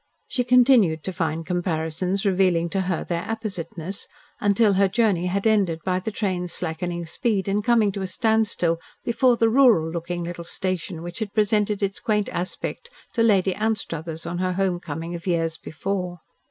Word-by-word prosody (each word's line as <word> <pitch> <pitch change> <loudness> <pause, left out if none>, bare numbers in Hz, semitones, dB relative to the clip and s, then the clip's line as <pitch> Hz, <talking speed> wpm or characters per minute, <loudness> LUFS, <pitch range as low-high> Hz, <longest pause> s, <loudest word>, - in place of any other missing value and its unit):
She 250 - 0
continued 240 - +5
to 190 - -3
find 165 -2 -2
comparisons 175 +2 -1
revealing 180 -3 +2
to 195 +3 0
her 185 -3 -1
their 170 -1 -2
appositeness, 190 -4 -4 0.3
until 205 +1 +3
her 195 +1 +4
journey 190 -4 +1
had 195 +3 -1
ended 200 -7 +2
by 185 -1 +1
the 185 - -3
train's 185 -5 -2
slackening 175 0 -3
speed 200 +3 -1
and 205 +1 0
coming 225 -3 +3
to 195 - -5
a 190 - -2
standstill 205 -4 +1 0.3
before 245 +1 +3
the 230 - +4
rural 225 -10 +5
looking 175 +1 -3
little 170 0 -5
station 180 -1 -3
which 175 +3 -7
had 215 -2 -4
presented 210 -1 +2
its 195 0 -1
quaint 210 -3 0
aspect 185 - -4 0.2
to 235 - +1
Lady 195 -4 +4
Anstruthers 170 -7 -3
on 175 +1 -3
her 185 0 0
home 185 -1 0
coming 165 +1 -5
of 170 +2 -7
years 165 -2 0
before. 180 +2 -4
185 Hz, 170 wpm, -24 LUFS, 170-210 Hz, 0.3 s, continued